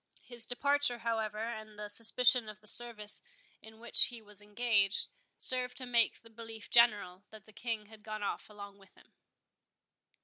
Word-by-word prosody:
His 240 -2 -7
departure, 280 0 -1
however, 225 -2 -4
and 215 -1 -7
the 210 0 -7
suspicion 230 +2 +3
of 210 0 -12
the 210 - -25
service 215 -2 +1 0.4
in 220 0 -16
which 235 - +6
he 240 -2 -5
was 210 -2 -12
engaged, 205 -1 +1 0.3
served 250 -1 +2
to 255 - -3
make 235 -2 0
the 230 - -18
belief 225 -1 -12
general, 205 -5 +2
that 215 -2 -15
the 215 - -19
King 225 -1 -5
had 215 0 -16
gone 215 -1 -7
off 200 - -5
along 200 -1 -12
with 195 -1 -22
him. - - -24
220 Hz, 170 wpm, -31 LUFS, 210-235 Hz, 0.4 s, which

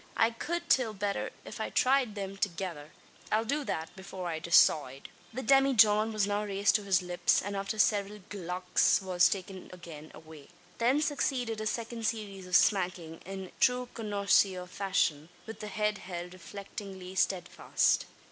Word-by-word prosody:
I 225 - +4
cowld 340 +9 -3
till 235 -8 +2
betther 200 0 -2 0.2
if - - -7
I - - -2
thryed 255 -4 +2
thim 195 -1 -5
thegither. 175 -6 -4 0.4
I'll 220 +1 +2
do 285 +5 -1
that, 160 -7 -4
before 190 -1 -7
I 160 -1 -3
decoide." 150 -5 +3 0.2
The 260 +3 -5
demijohn 225 -5 +5
was 215 -2 +1
now 205 +1 -1
raised 200 -1 +1
to 210 - -9
his 190 -2 +2
lips; 180 0 +2
and, 200 +1 -4
after 195 +2 -3
several 205 -1 +1
"glucks" 180 -2 +1
was 185 -1 +3
again 190 -1 -9
taken 165 -4 -11
away. 155 -2 -13 0.3
Then 260 +6 +3
succeeded 250 -6 -1
a 215 - -2
second 230 0 -3
series 200 -4 -4
of 180 - 0
smacking, 180 -5 +2
in 190 -1 -7
true 250 -1 +2
connoisseur 200 -3 +1
fashion, 180 -5 -1 0.2
with 225 - -9
the 210 - -6
head 210 0 -1
held 175 -1 -7
reflectingly 190 0 -9
steadfast. 185 -2 +1
200 Hz, 155 wpm, -30 LUFS, 180-220 Hz, 0.4 s, demijohn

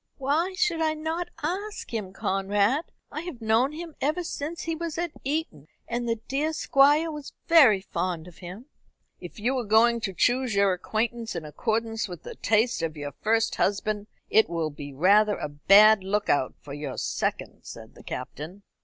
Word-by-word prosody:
"Why 310 +7 0
should 360 -5 +1
I 315 -1 +1
not 325 +3 -3
ask 395 - -4
him, 210 -5 -3
Conrad? 200 - 0 0.3
I 305 - -4
have 340 -8 -7
known 225 +4 +2
him 325 +1 -8
ever 310 +6 0
since 325 0 -5
he 330 - -2
was 330 -1 -5
at 345 -1 -2
Eton, 275 - -3 0.2
and 240 0 -2
the 230 - +2
dear 295 +4 -1
Squire 295 +3 +3
was 295 -2 -8
very 270 - +6
fond 180 -3 -3
of 175 - -15
him." 185 +7 -9 0.5
"If 175 +3 -10
you 245 +6 0
are - - -2
going 230 +2 +4
to 200 - -2
choose 245 +4 +1
your 200 -1 +4
acquaintance 225 +4 -2
in 165 -2 -4
accordance 225 +8 -2
with 175 -3 -9
the - - -7
taste 225 0 +1
of 160 -1 -3
your 145 -1 -5
first 225 +7 0
husband, 205 +1 0 0.2
it 220 -3 +4
will 165 -2 -2
be 145 0 -8
rather 200 +8 +4
a - - -3
bad 200 +8 +6
look 205 +2 -1
out 130 -3 +1
for 140 - -10
your 145 -2 -5
second," - - -2
said - - -11
the - - -15
Captain. 175 +8 -7
225 Hz, 180 wpm, -26 LUFS, 190-295 Hz, 0.5 s, very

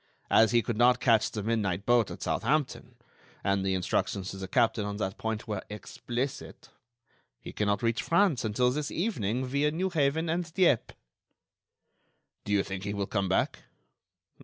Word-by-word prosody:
As 110 0 +6
he 120 -1 +3
could 115 +1 -3
not 125 +1 +5
catch 115 -4 +3
the 105 - -5
midnight 100 -4 -1
boat 120 -2 +3
at - - -7
Southampton—and 115 -7 -2
the 95 -1 0
instructions 95 +1 -1
to 95 - -8
the 95 0 -6
captain 110 +2 +2
on 100 0 -4
that 95 -2 -3
point 110 -1 -3
were 105 -3 -3
explicit—he 120 +2 -8
cannot 100 0 0
reach 115 -1 +1
France 170 - +2
until 125 +3 +1
this 145 +2 -2
evening 130 - -1
via 140 +3 +1
Newhaven 160 -2 0
and 170 +1 -2
Dieppe." 175 - +2 1.5
"Do - - -4
you 100 -1 +3
think 95 -1 -6
he 100 +1 -3
will 100 -1 -1
come 100 -1 -1
back?" 95 - 0
115 Hz, 155 wpm, -29 LUFS, 100-140 Hz, 1.5 s, As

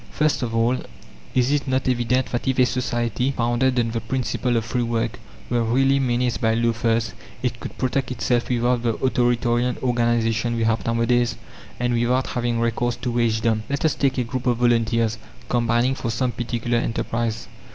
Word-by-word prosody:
First 155 -2 +1
of 115 -2 -2
all, 115 +3 +2 0.6
Is 130 +1 +3
it 145 -1 0
not 130 0 0
evident 125 +1 +1
that 120 +2 -2
if 130 - +1
a 130 - +5
society, 125 -1 -1
founded 125 0 +1
on 115 -1 0
the 115 0 -2
principle 125 0 -1
of 115 - -1
free 120 +2 -1
work, 115 -1 -1 0.3
were 120 -1 +1
really 135 +4 +3
menaced 120 -4 0
by 110 0 +2
loafers, 115 -1 +1 0.3
it 120 -2 -1
could - - -8
protect 130 +1 -1
itself 120 -1 0
without 120 0 +1
the 115 -2 0
authoritarian 120 -1 +1
organization 120 -1 +1
we 115 - 0
have 115 0 +1
nowadays, 115 +1 +2 0.4
and 120 0 0
without 120 +2 +1
having 120 -1 -1
recourse 115 +1 0
to 125 - -3
wagedom? 115 -2 +1
Let 140 +2 -1
us 155 - +3
take 135 -1 0
a 125 - +2
group 130 +2 -4
of 120 -1 +2
volunteers, 115 -1 +2 0.3
combining 120 +1 +2
for 120 - -4
some 125 +2 0
particular 120 0 -1
enterprise. 115 -1 -2
120 Hz, 175 wpm, -23 LUFS, 115-125 Hz, 0.6 s, a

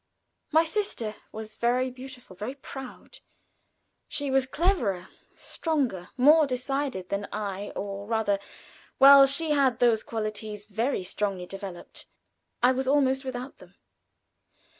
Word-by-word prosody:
My 320 +1 +5
sister 325 - -3
was 215 0 -8
very 250 +2 +1
beautiful, 255 -5 -11
very 215 +8 -5
proud. 270 - -10 0.9
She 285 -2 -3
was 265 -1 +2
cleverer, 250 - 0 0.3
stronger, 265 - -2
more 300 +4 +6
decided 255 -6 -3
than 200 0 -2
I, 205 -1 -4
or 200 0 -5
rather, 220 -3 +1 0.6
while 275 0 +9
she 300 +3 +4
had 270 -5 +3
those 235 -3 +3
qualities 215 -1 -5
very 220 +1 -1
strongly 195 -1 -2
developed, 195 -1 -8 0.6
I 250 - +6
was 260 0 -2
almost 265 -1 +2
without 255 0 -6
them. - - -17
250 Hz, 120 wpm, -27 LUFS, 205-275 Hz, 0.9 s, while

